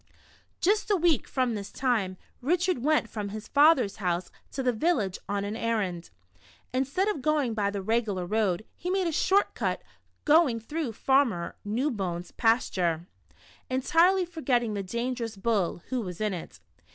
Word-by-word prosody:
Just 420 +4 +2
a 410 - +4
w^eek 340 -4 +2
from 255 -3 0
this 200 -2 -5
time, 220 -8 0 0.2
Richard 355 +4 +1
went 300 -5 +3
from 210 -3 -5
his 215 +1 -7
father's 285 -8 +4
house 180 -3 -2 0.2
to 265 - -3
the 250 -1 +2
village 220 - 0
on 200 0 -1
an 205 +2 -3
errand. 205 -7 -2 0.6
Instead 275 +10 0
of 415 -10 -1
going 295 -5 +1
by 205 -2 0
the 200 -1 -4
regular 215 -4 0
road, 210 0 0
he 360 - -5
made 380 0 +1
a 335 - 0
"short 385 +6 +2
cut," - - -2 0.4
going 295 -6 +5
through 285 +2 -4
Farmer 240 -9 +1
Newbone's 205 - -2
pasture, 180 -8 +1 0.6
entirely 335 +8 +3
forgetting 260 -10 0
the 200 - -2
dangerous 235 +2 -3
bull, 195 -5 0
who 255 -2 -1
was 180 -5 -6
in 215 -2 0
it. 175 - -8
235 Hz, 155 wpm, -28 LUFS, 200-300 Hz, 0.6 s, going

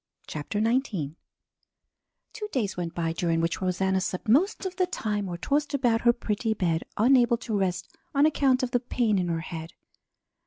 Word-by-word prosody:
CHAPTER 155 +7 -4
XIX 220 - 0 1.2
Two 430 -2 -5
days 215 -8 -1
went 170 -2 -4
by, 165 -1 -1
during 165 -1 0
which 165 +2 -1
Rosanna 190 +1 +1
slept 185 +4 -3
most 360 - +3
of 375 -1 -3
the 365 -1 +2
time 210 - -2
or 175 - -4
tossed 290 - 0
about 240 -4 +2
her 240 - +6
pretty 220 -1 -2
bed, 170 -4 0 0.2
unable 240 +1 +4
to 225 -2 -4
rest 190 -3 -1 0.3
on 280 +2 +5
account 270 -4 +3
of 250 - -1
the 245 - +2
pain 230 -4 0
in 180 - -1
her 165 -1 -1
head. 160 0 -7
215 Hz, 180 wpm, -27 LUFS, 175-255 Hz, 1.2 s, her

